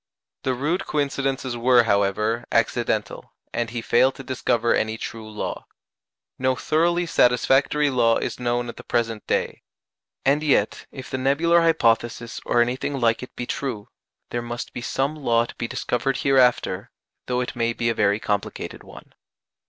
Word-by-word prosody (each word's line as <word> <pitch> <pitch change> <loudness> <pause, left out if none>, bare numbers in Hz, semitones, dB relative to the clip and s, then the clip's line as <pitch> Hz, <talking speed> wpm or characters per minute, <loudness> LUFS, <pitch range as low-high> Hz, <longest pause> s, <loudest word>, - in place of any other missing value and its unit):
The 130 -1 -1
rude 160 +9 -1
coincidences 135 -3 -1
were, 120 0 +5
however, 105 +2 +1
accidental, - - -1 0.2
and 120 -1 -1
he 120 -1 -5
failed 130 +3 +3
to 135 - -9
discover 120 -2 +1
any 110 0 0
true 110 -1 -7
law. 105 - -5 0.7
No 130 0 +2
thoroughly 170 +5 +1
satisfactory 140 +1 +3
law 115 -3 +3
is - - -4
known 120 0 -1
at 120 - -8
the - - -10
present 115 -2 -2
day. - - -1 0.6
And 140 +3 +3
yet, 140 -9 +1
if 130 -2 -9
the 130 - -2
nebular 160 +6 +3
hypothesis 120 -7 +1
or 120 - +4
anything 130 +3 -3
like 115 -2 +2
it 125 - -10
be 125 - -4
true, 120 -6 -4 0.4
there 120 - -1
must 120 0 -6
be - - -5
some 135 +4 -1
law 120 -6 +2
to - - -10
be 115 - -4
discovered 125 +3 -1
hereafter, 125 -6 +2 0.4
though 125 0 0
it 125 - -4
may 115 -1 +1
be 115 0 -2
a - - +1
very 100 -1 +2
complicated 100 -2 -3
one. - - -14
120 Hz, 160 wpm, -23 LUFS, 115-135 Hz, 0.7 s, were